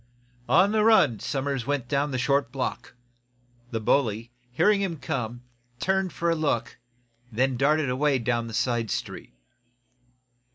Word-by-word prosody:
On 195 +2 +5
the 215 -1 +2
run 165 - +4
Somers 135 -3 -3
went 140 -4 -1
down 140 +2 0
the 130 - -2
short 140 -1 +1
block. 130 -2 -4 0.7
The 115 - -3
bully, 115 -1 0 0.2
hearing 200 +10 +3
him 180 -5 -2
come, 120 -3 -4 0.4
turned 190 -1 0
for 170 0 -1
a - - +1
look, 140 -9 -1 0.5
then 130 +3 +1
darted 140 +1 +2
away 140 +2 +2
down 120 -1 -1
the 115 - -6
side 120 -3 0
street. - - -5
135 Hz, 140 wpm, -26 LUFS, 120-155 Hz, 0.7 s, On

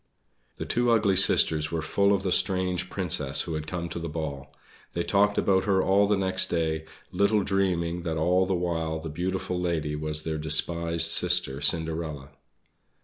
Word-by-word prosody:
The - - -5
two 120 0 0
ugly 105 -4 +2
sisters 80 -4 +3
were 80 -2 -3
full 100 +5 +1
of 100 -1 0
the 95 - -2
strange 90 -1 0
Princess 75 -7 +1
who 85 - -5
had 75 0 -5
come 85 +1 -4
to 85 - -6
the 85 0 -5
ball. 70 -3 -6 0.4
They 85 - -2
talked 100 +2 +1
about 95 -1 +1
her 95 -2 +2
all 100 +2 +3
the 105 0 +1
next 95 -1 0
day, 80 -2 -2 0.3
little 100 0 +1
dreaming 90 -3 -1
that 80 -2 -3
all 90 +4 +1
the 95 - 0
while 80 -2 -2
the 80 0 -7
beautiful 90 +2 -3
lady 80 -4 -2
was 75 0 -2
their 80 -1 -4
despised 85 +2 +1
sister 85 -5 +2
Cinderella. 80 -2 0
85 Hz, 175 wpm, -26 LUFS, 80-95 Hz, 0.4 s, sisters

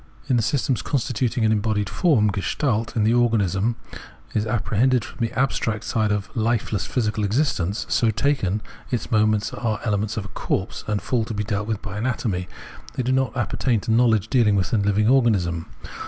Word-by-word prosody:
In 130 - +2
the 120 - +3
systems 125 +1 0
constituting 125 -3 0
an 110 - +3
embodied 105 -1 0
form 125 - +2
[Gestalt) 115 +3 -1
the 110 0 +3
organism 115 -2 +2 0.6
is 110 0 0
apprehended 120 +2 +1
from - - -12
the 115 -1 0
abstract 115 -4 0
side 110 -3 0
of 105 -1 -3
lifeless 110 -3 0
physical 110 -3 -1
existence: 105 - 0
so 115 - +2
taken, 110 -4 0 0.3
its 120 - -3
moments 110 -1 +2
are 110 -3 -2
elements 105 0 -1
of 105 - -3
a - - -9
corpse 95 - -3
and 105 -1 -1
fall 120 -3 0
to 115 - -5
be 105 - -1
dealt 105 -1 -2
with 110 -2 -3
by 105 0 -5
anatomy; 110 -6 -1 0.5
they 130 - -1
do 125 - 0
not 130 -3 0
appertain 120 0 0
to 115 - -2
knowledge 110 -3 +3
dealing 110 -5 +3
with 95 -2 0
the 115 - +3
hving 100 +1 +2
organism. 100 -10 +2
110 Hz, 180 wpm, -23 LUFS, 105-120 Hz, 0.6 s, the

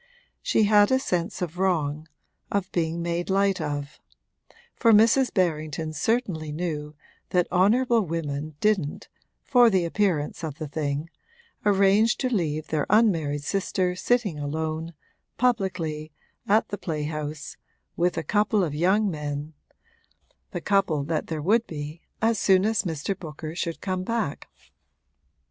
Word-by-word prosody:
She - - +2
had 205 0 +5
a 260 - +5
sense 180 -6 -2
of 175 +1 -5
wrong 155 -5 0 0.4
of 200 -2 -1
being 170 0 -1
made 170 +1 -2
light 195 -1 +2
of; 145 -1 -4 0.8
for 230 - +4
Mrs. 225 +5 +5
Berrington 155 -3 -1
certainly 165 - -1
knew 150 -2 -4 0.3
that 180 -1 +2
honourable 225 +6 +3
women 155 -4 -4
didn't 195 -8 0 0.3
(for 245 -3 +5
the 190 -4 +2
appearance 170 -4 0
of 155 -2 -4
the 155 -3 -5
thing) 150 +2 -3 0.6
arrange 200 +3 +4
to 255 -2 -1
leave 155 -6 -1
their 150 -2 0
unmarried 165 -10 +2
sister 185 0 -1
sitting 205 -5 0
alone, 160 +2 -3 0.4
publicly, 180 -10 -1 0.4
at 215 +2 +3
the 205 - -5
playhouse, 150 -1 -4 0.4
with 175 0 +1
a 165 - -1
couple 210 +4 +2
of 155 -5 -2
young 190 +7 +2
men 150 -2 -4 1.0
the 175 - -5
couple 190 -8 +1
that 155 +1 -2
there 155 -2 -4
would 225 +6 +3
be 150 +1 -7 0.2
as 225 -2 +3
soon 190 0 +4
as 220 -3 +2
Mr. 165 +2 -3
Booker 155 -3 -7
should 170 -1 -4
come 185 -2 -2
back. 220 -7 -2
175 Hz, 135 wpm, -25 LUFS, 155-205 Hz, 1.0 s, had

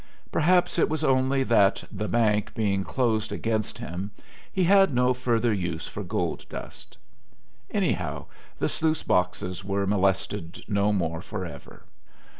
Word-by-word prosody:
Perhaps 175 +2 +3
it - - +3
was 155 0 -2
only 135 -1 +3
that 105 -5 +3
"the 105 0 -3
bank" 110 -2 +1
being 100 -4 +1
closed 110 -2 0
against 110 -2 -2
him 90 +5 -5 0.4
he 190 - +1
had 195 0 +5
no 125 0 +3
further 120 -2 +1
use 85 -5 -3
for - - -6
gold - - -2
dust. - - -9 0.7
Anyhow - - -1 0.3
the - - 0
sluice 155 -1 0
boxes 90 0 0
were 100 0 -1
molested 95 -2 0
no 100 0 +2
more 85 -5 -1
forever. 90 -8 -7
105 Hz, 135 wpm, -26 LUFS, 95-125 Hz, 0.7 s, had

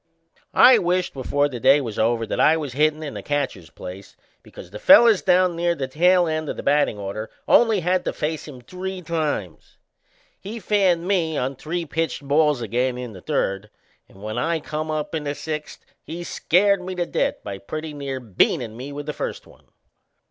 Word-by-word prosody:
I 250 -2 +8
wished 180 -1 0
before 145 +2 0
the 125 -4 -7
day 140 +5 +5
was 115 -6 -5
over 115 +1 +1
that - - -4
I 160 +1 +5
was 145 -5 -5
hittin' 155 +2 +1
in 145 - -5
the - - -6
catcher's 135 - -3
place, 95 +2 -10 0.2
because 90 - -13
the 105 - -8
fellers 235 -8 +7
down 180 -1 +3
near 170 0 0
the 135 -4 -3
tail 175 +6 +3
end 155 -2 -2
of - - -4
the - - -6
battin' 145 -6 +2
order 100 +2 -5 0.2
only 225 -5 +4
had 180 +1 +1
to - - 0
face 155 0 -3
him 130 -4 -10
three 185 +7 -6
times. 155 - -3 0.6
He 220 +4 -7
fanned 185 -4 +1
me 165 -6 0
on 130 +2 -2
three 165 +5 -4
pitched 160 -2 -3
balls 150 -3 +2
again 125 +3 -1
in 125 -3 -6
the 95 - -11
third, 100 +3 -2 0.4
and 95 - -16
when 110 +3 -3
I 165 +5 0
come 155 +1 -5
up 155 0 -3
in 160 -2 -2
the 145 0 -2
sixth 155 0 -6 0.2
he 170 +2 -7
scared 195 +3 +2
me 185 0 -6
to 175 -1 -1
death - - 0
by 100 -1 -6
pretty 155 +6 -6
near 140 -2 -5
beanin' 115 0 0
me 130 +4 -7
with 145 +1 -6
the 150 - -4
first - - -5
one. - - -21
150 Hz, 200 wpm, -22 LUFS, 125-175 Hz, 0.6 s, I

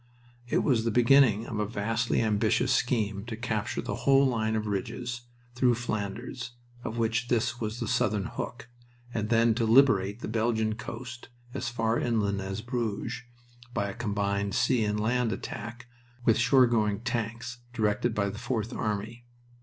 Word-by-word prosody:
It - - +1
was 120 -6 +2
the 115 - +1
beginning 120 -1 +5
of 110 - -4
a 105 - 0
vastly 115 +3 0
ambitious 105 -2 +2
scheme 105 -4 0
to 115 -2 -5
capture 110 -3 -2
the - - -3
whole 135 0 +4
line 110 -4 +1
of 110 -1 -1
ridges 120 +4 -4 0.3
through 125 -1 +3
Flanders, 120 +2 -4 0.3
of 115 - -4
which 115 +1 0
this 120 0 0
was 110 +1 -3
the - - -2
southern 120 -5 +1
hook, 120 -1 -6 0.5
and 110 -1 -2
then 115 0 +4
to 115 +1 -1
liberate 110 -4 +4
the - - -4
Belgian 110 0 +1
coast 120 +2 -8 0.2
as - - -2
far 115 -1 0
inland 100 -4 0
as 95 +2 -4
Bruges 120 -1 -3 0.5
by 100 -4 0
a - - -8
combined 100 -3 -1
sea 120 -4 +3
and 105 0 0
land 120 +2 +1
attack 115 +4 -6 0.4
with 115 - +5
shoregoing 115 -4 +3
tanks, 120 0 -3
directed 110 0 0
by 100 -1 +1
the 105 - -7
Fourth 115 -1 -2
Army. 110 +2 -3
115 Hz, 160 wpm, -28 LUFS, 105-120 Hz, 0.5 s, beginning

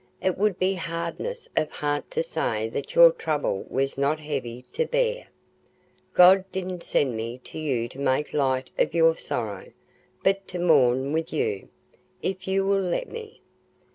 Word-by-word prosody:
It 185 -1 0
would 205 -1 +1
be 190 +1 +2
hardness 170 - -4
of 155 -1 +1
heart 145 0 -2
to 480 - -1
say 110 - -2
that 140 - -5
your 170 -1 +9
trouble 150 -11 -2
was 135 +1 -1
not 145 +3 +1
heavy 130 -5 -5
to 475 0 0
bear. - - 0 0.9
God 185 +1 +8
didn't 185 -1 -4
send 135 -7 0
me 115 +3 -5
to - - -8
you 130 -7 -1
to 135 - -12
make 140 +1 0
light 130 -3 0
of - - +1
your 165 -1 +5
sorrow, 105 - -4 0.6
but 195 0 +1
to 180 - -6
mourn 135 -6 +3
with 160 0 -1
you, 435 0 -2 0.5
if 190 0 -3
you 195 0 +1
will 195 0 +2
let 185 - -2
me. 450 -2 -9
165 Hz, 165 wpm, -25 LUFS, 135-190 Hz, 0.9 s, your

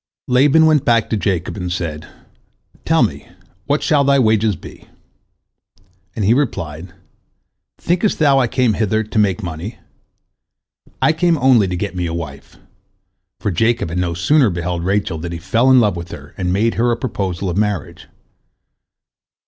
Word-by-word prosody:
Laban 140 +5 +4
went 155 -3 +3
back 115 -2 +1
to - - +2
Jacob, 95 -4 -2
and 90 -3 -4
said, 80 -4 -4 0.8
"Tell - - +3
me, - - -3 0.4
what 145 +1 0
shall 150 -4 +3
thy 140 0 +3
wages 110 -4 +2
be?" - - -13 1.3
and 105 - -1
he 110 - +4
replied, 90 - -3 0.9
"Thinkest 180 +4 0
thou 140 -3 +4
I 125 - +2
came 125 -1 +1
hither 110 +1 0
to 110 0 -2
make 105 0 +1
money? 90 +6 -6 1.3
I - - +4
came 170 0 +1
only 125 -6 +4
to 90 -1 -3
get 100 +1 -4
me 90 -1 -2
a 80 - -4
wife," 75 -5 -8 0.8
for 105 - -2
Jacob 115 +1 0
had 85 +2 -3
no 85 -2 -1
sooner 130 - +3
beheld 85 -1 -3
Rachel 95 -3 -1
than 85 +1 -5
he - - -4
fell 115 +9 +1
in 130 -1 +6
love 105 -5 +2
with 85 0 -7
her 70 0 -11
and 90 -2 -2
made 110 +5 +1
her 120 - +2
a 120 - 0
proposal 95 -7 -3
of 90 +1 -2
marriage. 105 -3 -2
105 Hz, 165 wpm, -18 LUFS, 90-125 Hz, 1.3 s, in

